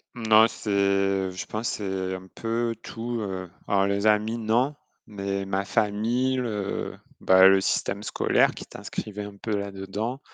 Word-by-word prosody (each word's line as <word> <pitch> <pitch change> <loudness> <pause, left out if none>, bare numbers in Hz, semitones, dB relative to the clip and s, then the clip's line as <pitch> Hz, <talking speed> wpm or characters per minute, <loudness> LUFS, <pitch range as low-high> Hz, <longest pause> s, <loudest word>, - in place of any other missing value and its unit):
Non, 110 -1 +6
c'est, 100 -3 +1
je 90 - -6
pense, 110 +2 -3
c'est 95 -2 -3
un 95 0 -9
peu 115 0 -1
tout, 120 +1 -4
heu 95 -3 -4 0.2
Alors, 100 -1 +3
les 100 +1 +1
amis, 110 +2 +2
non, 120 +6 +1 0.3
mais 100 -1 -3
ma 95 0 -1
famille, 115 +6 +1
le, 105 -5 -3 0.2
bah, 95 0 +7
le 95 0 +5
système 100 +1 -1
scolaire 105 - +2
qui - - -8
t'inscrivait 105 -1 -6
un 100 -1 -10
peu 105 0 -2
là-dedans, 100 +5 -4
105 Hz, 150 wpm, -26 LUFS, 95-115 Hz, 0.3 s, bah